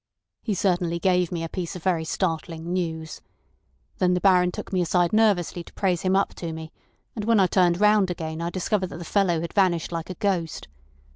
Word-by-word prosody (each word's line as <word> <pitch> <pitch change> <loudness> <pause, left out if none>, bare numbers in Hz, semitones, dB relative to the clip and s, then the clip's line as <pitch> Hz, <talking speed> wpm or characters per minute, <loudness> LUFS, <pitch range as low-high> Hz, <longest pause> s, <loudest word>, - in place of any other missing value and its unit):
He 210 - -2
certainly 175 -2 0
gave 180 0 +1
me 170 -2 -3
a - - -2
piece 175 +2 -5
of 180 - -8
very 170 -4 +1
startling 165 -1 -2
news. 160 -3 -3 0.8
Then 180 -1 +3
the - - +1
Baron 180 -2 +4
took - - -8
me 185 - +2
aside 175 +1 +1
nervously 200 -6 +2
to - - -16
praise 180 -4 0
him 190 0 +1
up 195 - +1
to 170 -2 -4
me, 160 0 -7 0.4
and 210 -3 -4
when 225 -1 +4
I 190 - +5
turned 180 -1 +2
round 210 -2 +4
again 160 -2 -4
I 170 - -1
discovered 185 +2 -1
that - - -9
the 170 - -8
fellow 175 -3 +1
had 170 - -5
vanished 180 -5 +2
like 165 0 -4
a 185 - -5
ghost. 175 - -2
180 Hz, 210 wpm, -25 LUFS, 170-190 Hz, 0.8 s, I